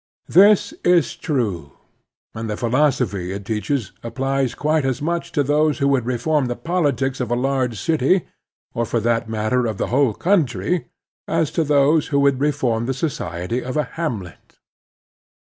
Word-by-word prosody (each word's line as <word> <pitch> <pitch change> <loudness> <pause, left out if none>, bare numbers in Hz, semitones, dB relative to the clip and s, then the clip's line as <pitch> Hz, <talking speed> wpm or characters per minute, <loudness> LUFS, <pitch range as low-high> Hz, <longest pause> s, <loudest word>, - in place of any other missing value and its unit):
This 200 +3 +5
is 175 -1 +3
true, 100 - -2 0.6
and 110 0 -5
the 105 - -3
philos 130 +4 +2
ophy 95 -5 -3
it 100 0 -7
teaches 110 +2 -2
applies 135 +2 -1
quite 155 0 +1
as 130 -3 -1
much 170 +3 -2
to 145 -4 +2
those 150 +2 +2
who 140 - +1
would 130 -4 +1
reform 130 +3 0
the 120 - -2
politics 145 -6 -1
of 125 -3 -2
a 120 - +1
large 125 -3 -1
city, 160 +3 +2 0.5
or, 120 - -1
for 115 +1 -1
that 115 0 0
matter, 110 +3 0
of 110 -3 -3
the - - -2
whole 130 -5 +3
coimtry, 165 - +1 0.4
as 165 -3 0
to 165 - +1
those 145 +1 +3
who 140 -2 +1
would 140 -2 +3
reform 130 -6 0
the 135 - -1
society 115 - -3
of 130 +4 -4
a 150 - +2
hamlet. 115 - -5
135 Hz, 165 wpm, -21 LUFS, 115-150 Hz, 0.6 s, This